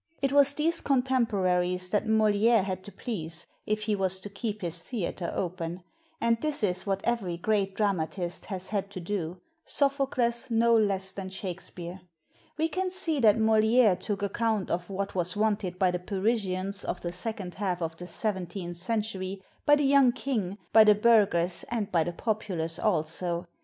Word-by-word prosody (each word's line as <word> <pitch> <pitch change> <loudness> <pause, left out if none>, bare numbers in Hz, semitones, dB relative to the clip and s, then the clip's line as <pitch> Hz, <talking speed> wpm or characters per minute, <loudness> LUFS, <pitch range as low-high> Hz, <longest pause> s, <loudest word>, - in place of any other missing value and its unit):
It 275 -1 0
was 285 0 +5
these 325 +3 +1
contemporaries 195 -9 +1
that 210 +2 0
Moliere 220 0 +3
had 185 -1 -4
to 205 - -6
please, 165 -10 -3 0.2
if 215 0 0
he 210 -1 0
was 190 -1 0
to 205 - -7
keep 210 +1 -4
his 170 0 0
theater 180 -6 -4
open; 175 -1 -4 0.4
and 230 -3 +1
this 305 -6 +2
is 185 -1 0
what 195 0 0
every 200 -8 -1
great 195 +1 0
dramatist 180 -3 -1
has 190 -2 -4
had 200 -1 -2
to 195 - -7
do, 175 -1 -3 0.3
Sophocles 265 -3 0
no 230 0 +4
less 195 -3 +2
than 190 -1 -6
Shakspere. 180 -1 -6 0.6
We 320 +1 +2
can 370 +3 -2
see 335 -5 0
that 220 -3 +5
Moliere 220 -1 +4
took 205 +1 -4
account 215 0 -1
of 175 +2 -2
what 195 +1 -3
was 180 +1 -1
wanted 205 -4 0
by 185 -1 +3
the 180 - -2
Parisians 195 0 -1
of 180 - -4
the 175 - -3
second 190 0 -3
half 185 -3 -2
of 165 -1 -3
the 180 - -8
seventeenth 180 -2 -3
century, 195 -1 -2 0.2
by 295 - +8
the 290 -1 +1
young 270 -3 +5
King, 215 -8 -2 0.2
by 220 - +9
the 210 -1 +6
burghers, 200 -6 +3
and 225 -4 -2
by 165 -2 +3
the 175 - -3
populace 180 -5 -2
also. 175 -2 0
200 Hz, 170 wpm, -28 LUFS, 180-225 Hz, 0.6 s, by